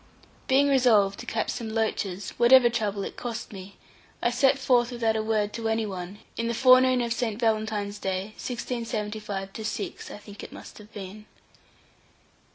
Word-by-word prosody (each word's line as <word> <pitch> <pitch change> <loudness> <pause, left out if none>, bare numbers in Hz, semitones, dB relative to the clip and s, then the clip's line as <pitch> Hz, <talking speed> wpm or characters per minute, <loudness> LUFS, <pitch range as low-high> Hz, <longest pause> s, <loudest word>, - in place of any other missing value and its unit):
Being 275 +2 +4
resolved 230 -8 +4
to - - -9
catch 220 -1 -1
some 225 -2 -5
loaches, 205 -4 -2
whatever 240 0 +7
trouble 210 -4 -1
it - - -6
cost 235 -2 -6
me, 195 0 -10 0.4
I 240 - +1
set 270 +2 +3
forth 245 -3 +3
without 230 -2 0
a 220 - +1
word 215 -1 0
to 230 0 -3
any 220 0 0
one, 190 -1 -6 0.2
in 230 - -1
the 235 - -1
forenoon 255 0 +6
of 235 -1 0
St. 235 -3 -2
Valentine's 215 -3 -1
day, 190 +2 -3
1675 215 -5 -4
6, 215 -1 -4
I - - -8
think 205 0 -12
it - - -9
must - - -11
have 210 +1 -14
been. 205 +1 -9
220 Hz, 165 wpm, -26 LUFS, 205-240 Hz, 0.4 s, whatever